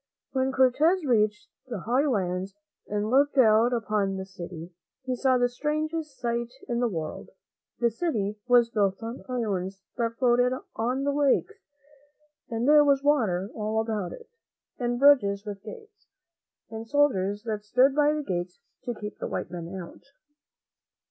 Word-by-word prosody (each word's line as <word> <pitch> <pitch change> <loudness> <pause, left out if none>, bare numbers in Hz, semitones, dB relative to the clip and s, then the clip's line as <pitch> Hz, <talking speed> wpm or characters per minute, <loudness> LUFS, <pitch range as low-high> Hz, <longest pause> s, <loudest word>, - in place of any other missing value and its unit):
When 265 0 0
Cortez 290 +7 +3
reached 215 -5 +1 0.2
the 230 -7 -5
high 255 - +1
lands 190 -5 -1 0.3
and 210 +1 -2
looked 280 +2 +3
out 225 -1 +5
upon 210 -4 0
the 190 - -5
city, 175 -2 -9 0.3
he 255 -1 -1
saw 255 0 +2
the 245 0 +3
strangest 305 +3 -3
sight 235 0 -2 0.2
in 240 -2 -1
the 245 - +2
world. 160 -5 -5 0.5
The 235 -1 +2
city 215 - -2
was 240 -2 +5
built 200 -1 0
on 230 +3 -6
islands 195 -6 -3
that 230 -1 -1
floated 245 0 +3 0.2
on 250 +4 -1
the 285 - +1
lakes, 290 +8 +2 1.0
and 230 +2 -1
there 300 0 +7
was 280 -1 +3
water 215 -10 +1
all 215 0 -1
about 215 -5 -2
it, 465 - -11 0.5
and 240 -1 -1
bridges 230 -8 +4
with 200 -2 -6
gates, 435 - -12 0.6
and 225 0 -7
soldiers 210 -8 +1
that 215 -3 -3
stood 255 +6 +3
by 295 +1 +3
the 300 0 -2
gates 180 -4 -4 0.3
to 240 -2 -3
keep 210 -1 -8
the - - -3
white - - -4
men 170 -1 -6
out. 180 -3 -9
235 Hz, 155 wpm, -27 LUFS, 205-265 Hz, 1.0 s, there